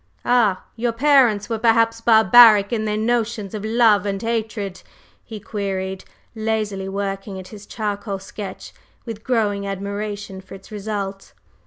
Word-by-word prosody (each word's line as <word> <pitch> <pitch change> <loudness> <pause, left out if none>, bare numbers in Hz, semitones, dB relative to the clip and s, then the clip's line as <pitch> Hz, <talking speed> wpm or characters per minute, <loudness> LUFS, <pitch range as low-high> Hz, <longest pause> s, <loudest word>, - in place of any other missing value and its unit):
"Ah! 225 -6 +2
Your 235 0 -1
parents 245 -5 +3
were 225 -2 -3
perhaps 230 0 +2
barbaric 220 -1 +6
in 220 -2 -1
their 210 0 -1
notions 225 -2 -1
of 210 -1 -5
love 220 -3 +3
and 200 -1 -2
hatred?" 220 -3 -3 0.4
he 220 -2 -9
queried, 190 -3 -4 0.3
lazily 215 -3 -2
working 195 0 -4
at 185 - -10
his 205 -1 -12
charcoal 205 -2 -4
sketch 195 +1 -9 0.3
with 225 -3 -7
growing 205 -5 0
admiration 200 0 -5
for 190 +1 -12
its 195 +3 -15
result. 200 -2 -5
210 Hz, 140 wpm, -21 LUFS, 195-225 Hz, 0.4 s, barbaric